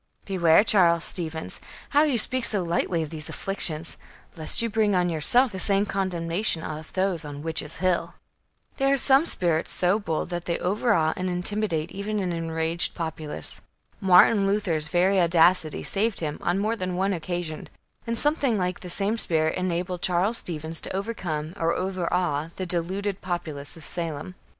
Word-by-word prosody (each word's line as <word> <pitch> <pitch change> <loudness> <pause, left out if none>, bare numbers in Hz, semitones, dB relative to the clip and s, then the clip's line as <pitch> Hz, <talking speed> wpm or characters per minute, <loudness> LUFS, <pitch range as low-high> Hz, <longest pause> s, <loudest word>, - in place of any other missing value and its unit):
"Beware, 175 -2 +4
Charles 170 -6 +3
Stevens, 160 -3 -3 0.3
how 290 - +4
you 295 -5 +2
speak 255 +3 +5
so 200 -4 +2
lightly 170 0 -1
of 155 - -8
these 155 -2 -6
afflictions, 165 -4 0 0.4
lest 160 -2 +3
you - - +1
bring 215 -2 +1
on 180 -1 +1
yourself 225 - +3
the 190 - -6
same 200 +1 +2
condemnation 180 -2 -1
of 155 0 -7
those 185 -3 0
on 145 -1 -8
Witches' 160 -1 -3
Hill." 180 +1 -1 0.6
There 275 0 +2
are 275 - +3
some 275 +4 +4
spirits 170 - +2
so 180 +4 +2
bold, 165 -4 -3
that 175 0 -4
they 170 - -1
overawe 180 -4 +1
and 185 0 -3
intimidate 180 -2 -1
even 205 +2 -4
an 185 -3 -2
enraged 165 0 0
populace. 155 - -6 0.4
Martin 195 +2 +5
Luther's 180 -7 +2
very 185 +3 +2
audacity 170 -1 +3
saved 210 +2 0
him, 150 -2 -4
on 175 +2 0
more 215 +3 0
than 185 -4 -4
one 195 +2 0
occasion, 175 -2 -5 0.4
and 230 0 -2
something 290 -5 +1
like 180 -1 -2
the 180 - -9
same 205 +5 +1
spirit 160 -4 +1
enabled 180 0 -3
Charles 190 +5 +1
Stevens 160 -1 -2
to - - -5
overcome 180 -7 -4
or 165 -1 0
overawe 180 -4 -1
the 185 - -4
deluded 185 +3 -2
populace 160 -5 -4
of 160 - -9
Salem. 165 +1 -4
180 Hz, 165 wpm, -25 LUFS, 165-200 Hz, 0.6 s, speak